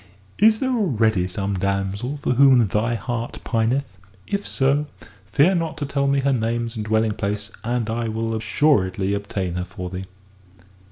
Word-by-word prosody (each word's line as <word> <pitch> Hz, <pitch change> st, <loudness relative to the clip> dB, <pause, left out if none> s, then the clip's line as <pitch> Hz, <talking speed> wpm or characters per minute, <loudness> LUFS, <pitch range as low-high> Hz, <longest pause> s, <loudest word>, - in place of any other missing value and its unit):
"Is 220 Hz, +2 st, +5 dB
there 260 Hz, -1 st, 0 dB
already 110 Hz, -, +1 dB
some 100 Hz, +2 st, -3 dB
damsel 100 Hz, +7 st, -1 dB
for -, -, +1 dB
whom 130 Hz, -2 st, +6 dB
thy 110 Hz, +4 st, 0 dB
heart 120 Hz, 0 st, -4 dB
pineth? 120 Hz, +4 st, +1 dB, 0.4 s
If 200 Hz, 0 st, -3 dB
so, 140 Hz, +2 st, +1 dB, 0.4 s
fear 150 Hz, -, +4 dB
not 165 Hz, -3 st, -2 dB
to 145 Hz, -, -2 dB
tell 140 Hz, 0 st, 0 dB
me 140 Hz, 0 st, +2 dB
her 140 Hz, 0 st, +2 dB
names 115 Hz, 0 st, -1 dB
and 110 Hz, -, -3 dB
dwelling 110 Hz, +1 st, +1 dB
place, 105 Hz, 0 st, -3 dB
and 120 Hz, -1 st, -1 dB
I 115 Hz, +1 st, -2 dB
will 115 Hz, 0 st, -2 dB
assuredly 100 Hz, -5 st, +1 dB
obtain 100 Hz, -3 st, -3 dB
her 90 Hz, 0 st, -2 dB
for 90 Hz, -1 st, -7 dB
thee." 95 Hz, +1 st, -5 dB
115 Hz, 165 wpm, -22 LUFS, 100-140 Hz, 0.4 s, whom